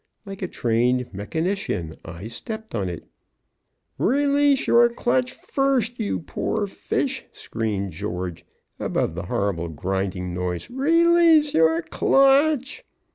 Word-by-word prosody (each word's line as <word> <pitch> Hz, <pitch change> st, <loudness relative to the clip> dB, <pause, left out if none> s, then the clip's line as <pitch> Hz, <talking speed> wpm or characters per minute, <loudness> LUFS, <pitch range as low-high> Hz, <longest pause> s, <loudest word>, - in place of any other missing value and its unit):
Like 195 Hz, -1 st, -8 dB
a 185 Hz, -, -1 dB
trained 125 Hz, -2 st, 0 dB
mechanician 105 Hz, -, -2 dB
I 85 Hz, +4 st, -9 dB
stepped 220 Hz, -, -7 dB
on 95 Hz, -4 st, -1 dB
it. 85 Hz, -, -7 dB, 1.0 s
"Release 285 Hz, +1 st, +3 dB
your 235 Hz, 0 st, +5 dB
clutch 245 Hz, +2 st, 0 dB
first, 260 Hz, -4 st, -1 dB
you 210 Hz, -5 st, -1 dB
poor 205 Hz, +5 st, -2 dB
fish!" 260 Hz, +6 st, -2 dB
screamed 105 Hz, -4 st, -3 dB
George, 90 Hz, -1 st, -5 dB, 0.4 s
above -, -, -1 dB
the 85 Hz, +1 st, -6 dB
horrible 90 Hz, -4 st, -1 dB
grinding 90 Hz, +2 st, -3 dB
noise. 90 Hz, -, -4 dB
"Release 330 Hz, +2 st, +4 dB
your 160 Hz, +1 st, +3 dB
clutch!" 275 Hz, -, +3 dB
170 Hz, 115 wpm, -23 LUFS, -, 1.0 s, your